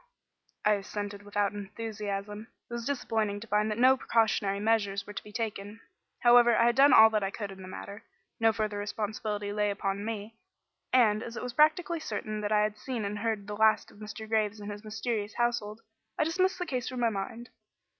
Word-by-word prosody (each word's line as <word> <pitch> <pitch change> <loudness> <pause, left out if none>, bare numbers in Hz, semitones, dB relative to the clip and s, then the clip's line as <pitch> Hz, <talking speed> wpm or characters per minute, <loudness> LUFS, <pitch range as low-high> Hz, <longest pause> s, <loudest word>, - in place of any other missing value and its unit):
I 210 - +5
assented 205 0 -4
without 205 0 -1
enthusiasm. 205 0 -5 0.2
It - - -10
was 235 -1 -4
disappointing 220 -7 -1
to - - -7
find 210 0 +1
that 215 - -2
no 255 +2 +6
precautionary 220 -5 +1
measures 205 -2 +1
were 210 - -9
to - - -6
be 210 - -12
taken. 210 -1 -4 0.4
However, 240 -1 +6
I 230 - +4
had 240 0 +3
done 275 +2 +7
all 220 -2 +8
that 215 -1 +1
I 195 - -1
could 200 0 -6
in 190 0 -11
the 185 - -9
matter. 200 +2 -8 0.4
No 225 0 +5
further 215 -2 -2
responsibility 210 0 -3
lay 210 0 +1
upon 200 0 -2
me, 220 0 -5 0.5
and, 220 -4 +4
as 235 0 -7
it - - -5
was 250 -1 -4
practically 315 +4 +3
certain 215 -5 -4
that 210 0 -2
I 210 -1 +4
had 210 0 -1
seen 240 -4 -3
and 205 +1 -3
heard 220 -2 -2
the 210 0 -5
last 220 +1 +3
of - - -18
Mr. 215 +1 -8
Graves 215 -1 0
and 205 0 -6
his 205 +1 -8
mysterious 215 -1 -3
household, 235 -3 -1 0.4
I - - +3
dismissed 370 +4 +1
the 360 - -3
case 255 -6 -3
from 255 -1 -5
my 230 -1 +3
mind. 225 +4 -5
215 Hz, 205 wpm, -29 LUFS, 205-235 Hz, 0.5 s, all